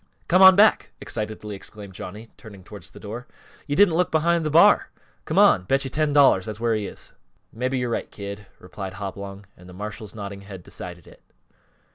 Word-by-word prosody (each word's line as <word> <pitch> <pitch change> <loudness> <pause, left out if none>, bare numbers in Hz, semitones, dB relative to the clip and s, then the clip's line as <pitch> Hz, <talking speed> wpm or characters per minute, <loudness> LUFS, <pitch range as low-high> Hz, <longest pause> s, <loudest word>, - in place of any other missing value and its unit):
"Come 185 +2 +4
on 190 0 +10
back!" 210 +2 +4
excitedly 105 -1 -5
exclaimed 100 0 -10
Johnny, 105 +5 -9
turning 100 -4 -13
towards 100 -2 -10
the - - -14
door. 115 +4 -8 0.4
"You 145 - -1
didn't 195 0 +5
look 175 +1 +1
behind 170 +1 +1
th' 155 - -2
bar! 165 +3 +5 0.4
Come - - -3
on 90 - +5
bet 135 +8 +1
you 135 - -5
ten 155 +1 0
dollars 135 -9 +4
that's 105 -1 -6
where 115 0 +1
he 105 -2 -2
is!" - - -10 0.4
"Mebby 130 +3 -2
yo're 125 -1 -2
right, - - -3
Kid," 100 0 -8
replied 95 +1 -8
Hopalong, 100 0 -7
and 90 +1 -16
the - - -12
marshal's 105 +2 -8
nodding 100 -2 -7
head 95 -2 -11
decided 90 -1 -10
it. - - -18
105 Hz, 195 wpm, -23 LUFS, 100-135 Hz, 0.4 s, on